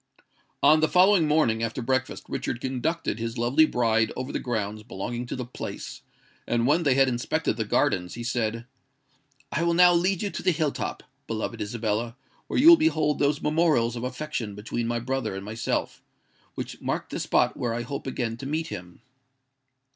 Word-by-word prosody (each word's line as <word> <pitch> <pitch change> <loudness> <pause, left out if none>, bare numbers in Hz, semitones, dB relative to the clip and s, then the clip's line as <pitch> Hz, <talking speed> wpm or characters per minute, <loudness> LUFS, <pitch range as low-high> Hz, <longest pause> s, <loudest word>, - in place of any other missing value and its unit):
On 155 +1 +7
the 155 - +3
following 180 -1 +5
morning, 150 -8 +2
after 115 +2 -2
breakfast, 130 +2 -1
Richard 120 - -3
conducted 135 +1 -2
his 115 +1 -4
lovely 130 +7 +4
bride 115 -3 +1
over 130 +2 -4
the - - -2
grounds 110 -3 -3
belonging 120 +3 -5
to - - -4
the 125 -1 -4
Place; 125 - -7 0.5
and 120 0 +1
when 150 +6 +3
they 140 -5 +3
had 135 0 +5
inspected 120 -2 -1
the - - -2
gardens, 90 -1 0
he 120 - -6
said, 115 -1 -2 0.9
"I 155 - -1
will 170 0 +2
now 180 0 +7
lead 180 +3 +1
you 200 - -2
to - - -5
the - - +2
hill 155 -2 0
top, - - -5 0.2
beloved 110 -1 -3
Isabella, 110 +2 -2 0.3
where - - -2
you 290 - +5
will 340 - +10
behold 155 - +1
those 145 +1 +1
memorials 150 -7 +2
of 120 - -5
affection 125 -5 -4
between 115 +3 -3
my 120 0 0
brother 130 -3 -2
and 95 0 -6
myself, 110 +2 -2 0.5
which - - -6
mark - - -3
the - - -3
spot - - +2
where 115 -2 -2
I 120 - -2
hope 140 +3 -6
again 120 -3 -2
to 135 - -6
meet 160 +2 -2
him." 90 +3 -9
125 Hz, 185 wpm, -26 LUFS, 115-155 Hz, 0.9 s, will